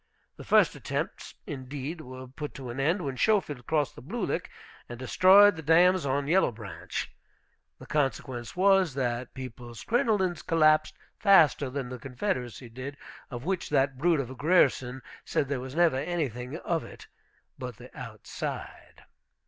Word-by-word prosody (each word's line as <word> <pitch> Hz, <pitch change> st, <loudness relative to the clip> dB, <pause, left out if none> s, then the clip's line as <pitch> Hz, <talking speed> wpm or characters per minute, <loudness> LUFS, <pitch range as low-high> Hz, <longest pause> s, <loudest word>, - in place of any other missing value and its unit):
The -, -, -10 dB
first -, -, +4 dB
attempts, -, -, -4 dB
indeed, 140 Hz, +4 st, -6 dB
were 130 Hz, -1 st, -9 dB
put 145 Hz, +3 st, -7 dB
to 130 Hz, -3 st, -6 dB
an 125 Hz, -, -6 dB
end, 170 Hz, +7 st, +1 dB
when 135 Hz, -3 st, -4 dB
Schofield 150 Hz, -, +1 dB
crossed 150 Hz, -4 st, +1 dB
the -, -, -12 dB
Blue 220 Hz, -, -3 dB
Lick, -, -, -3 dB, 0.4 s
and 120 Hz, -, -7 dB
destroyed 190 Hz, -, +6 dB
the 160 Hz, -, -7 dB
dams 175 Hz, +2 st, +4 dB
on 140 Hz, +1 st, 0 dB
Yellow 180 Hz, -2 st, +3 dB
Branch. 95 Hz, -6 st, -6 dB, 0.6 s
The -, -, -12 dB
consequence 130 Hz, -4 st, -2 dB
was, 190 Hz, -5 st, +4 dB
that 125 Hz, -2 st, -2 dB
people's 120 Hz, -2 st, -8 dB
crinolines 215 Hz, -, +1 dB
collapsed 155 Hz, -1 st, +3 dB, 0.2 s
faster 165 Hz, -9 st, +5 dB
than 130 Hz, -1 st, -4 dB
the 125 Hz, 0 st, -7 dB
Confederacy 125 Hz, -, -3 dB
did, 130 Hz, +5 st, -8 dB, 0.3 s
of 120 Hz, -2 st, -7 dB
which 185 Hz, -1 st, -2 dB
that 135 Hz, -1 st, +1 dB
brute 165 Hz, 0 st, +3 dB
of 130 Hz, -2 st, -3 dB
a -, -, -8 dB
Grierson 135 Hz, -5 st, +2 dB, 0.2 s
said 140 Hz, -, -1 dB
there 140 Hz, -2 st, -1 dB
was 130 Hz, +2 st, -7 dB
never 170 Hz, -5 st, +4 dB
anything 135 Hz, -4 st, -3 dB
of 170 Hz, -2 st, -2 dB
it -, -, -12 dB, 0.5 s
but -, -, -6 dB
the -, -, -14 dB
outside. -, -, -7 dB
140 Hz, 155 wpm, -28 LUFS, 125-175 Hz, 0.6 s, destroyed